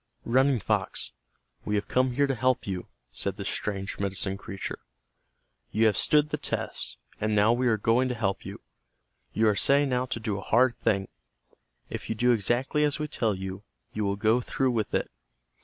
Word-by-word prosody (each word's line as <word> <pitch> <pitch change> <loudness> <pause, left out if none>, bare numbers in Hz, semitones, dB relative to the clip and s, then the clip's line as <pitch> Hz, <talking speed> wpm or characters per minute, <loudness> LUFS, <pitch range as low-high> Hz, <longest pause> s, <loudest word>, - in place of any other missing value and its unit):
"Running 130 +2 +3
Fox, - - -1 0.5
we 105 - -1
have 100 0 -1
come 130 0 +2
here 140 +3 +3
to 135 - 0
help 130 0 +1
you," 95 -3 -4 0.2
said - - -2
this - - -3
strange 100 -1 -3
medicine 95 0 -1
creature. 100 0 -6 0.9
"You 110 +2 +2
have 105 -2 +4
stood 150 +6 +4
the - - -1
test, - - -2 0.2
and 110 0 0
now 105 +3 +5
we 125 +1 +1
are 110 -2 +3
going 115 +5 +2
to 125 - -2
help 100 -4 -1
you. - - -8 0.7
You 110 - +2
are 105 - +3
setting 140 +4 +3
out 125 0 0
to 115 - -2
do 105 -3 -2
a - - -7
hard 120 +4 +3
thing. 95 -2 +1 0.8
If - - -5
you 110 - -1
do 125 +3 +3
exactly 120 +7 +1
as 145 -1 +1
we 150 -1 -3
tell 110 -7 0
you, 95 +1 -6 0.3
you 105 - -2
will 100 0 0
go 110 +4 +2
through 130 +1 0
with 110 -3 -1
it. - - -1
115 Hz, 190 wpm, -27 LUFS, 100-130 Hz, 0.9 s, now